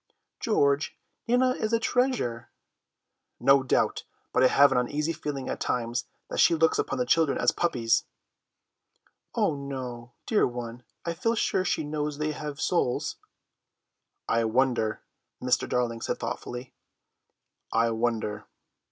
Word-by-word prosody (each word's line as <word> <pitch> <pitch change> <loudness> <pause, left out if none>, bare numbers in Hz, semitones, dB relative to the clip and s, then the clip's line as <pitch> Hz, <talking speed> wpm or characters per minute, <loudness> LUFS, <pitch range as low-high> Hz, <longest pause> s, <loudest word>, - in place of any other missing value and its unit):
"George, 145 -10 +1 0.3
Nana 250 +2 +4
is 220 -3 -2
a 230 - +4
treasure." 235 - 0 0.9
"No 135 +2 +5
doubt, 130 - +1 0.3
but - - +3
I - - +8
have 140 +2 +6
an - - +3
uneasy 150 +6 -1
feeling 145 -4 -4
at - - -3
times 120 -1 -1 0.2
that - - -4
she 170 - +6
looks 160 0 +3
upon - - -1
the 125 - +1
children 155 +2 +3
as - - +3
puppies." 120 -10 +1 1.3
"Oh - - +2
no, 130 -4 -6
dear 215 - +3
one, 120 -1 -6 0.2
I 170 - -1
feel 230 +7 0
sure 190 - +1
she 175 -3 0
knows 150 -1 -3
they 155 0 -1
have 150 -1 -6
souls." 145 -8 0 1.1
"I 115 0 +2
wonder," 120 -2 +1 0.4
Mr. 125 0 +1
Darling 120 -2 0
said - - -2
thoughtfully, 125 +1 -5 1.0
"I 115 +1 +2
wonder." 110 -2 -1
135 Hz, 135 wpm, -27 LUFS, 120-160 Hz, 1.3 s, I